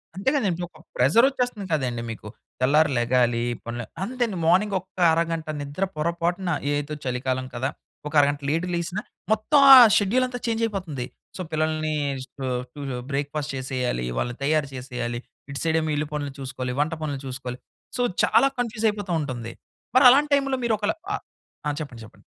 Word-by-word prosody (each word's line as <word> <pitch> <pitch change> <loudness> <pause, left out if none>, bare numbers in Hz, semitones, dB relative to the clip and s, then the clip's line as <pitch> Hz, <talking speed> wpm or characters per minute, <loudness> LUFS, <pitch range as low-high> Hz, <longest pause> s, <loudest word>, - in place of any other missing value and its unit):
అంతే 195 +7 +1
గదండీ, 190 -10 0
ఒక 165 -2 -20 0.2
ప్రెజరొచ్చేస్తుంది 235 - +3
కదండీ 125 -6 0
మీకు, 105 -1 -9 0.3
తెల్లారి 150 +3 +4
లెగాలి, 120 -1 +2 0.2
పనులు 120 +1 -4 0.2
అంతే 250 +4 -1
అండి 195 - -5
మార్నింగొక్క 190 +1 +1 0.2
అరగంట 165 -1 -1
నిద్ర 145 +6 -3
పొరపాటున 170 +3 -1 0.2
ఏదో 145 +1 -2
చలికాలం 130 0 -1
కదా! 130 +3 -1 0.4
ఒక 150 - -8
అరగంట 145 0 +1
లేట్‌గా 165 +4 0
లేగిసినా, 175 +4 -2 0.3
మొత్తం 220 +7 +3
ఆ - - +14 0.2
షెడ్యూలంతా 245 +5 +1
చేంజయిపోతుంది. 195 - -2 0.3
సో, - - -4
పిల్లల్ని 155 0 0 0.3
స్టు 130 +1 -8 0.3
టుజొ 140 -4 -5
బ్రేక్‌ఫాస్ట్ 145 +1 -2
చేసేయాలి, 130 - -2
వాళ్ళని 120 - -3
తయారు 150 0 +1
చేసేయాలి. 125 -2 -4 0.3
ఇటు 140 - -4
సైడేమో 160 -1 +1
ఇల్లు 150 +1 -1
పనులు 145 -2 -3
చూసుకోవాలి, 130 -1 -4
వంట 160 +3 0
పనులు 145 -3 -3
చూసుకోవాలి. 125 -1 -6 0.4
సో, - - 0 0.2
చాలా 235 +5 +4
కన్‌ఫ్యూజయిపోతా 215 -4 -1
ఉంటుంది. 120 -5 -5 0.4
మరి 260 - +7
అలాంటి 285 +3 +4
టైంలో, 275 -2 0
మీరొకల 215 -2 +1 0.2
ఆ - - +1 0.5
ఆ! - - +1
చెప్పండి. 125 -6 -8
చెప్పండి. 110 - -19
155 Hz, 150 wpm, -24 LUFS, 130-200 Hz, 0.5 s, ఆ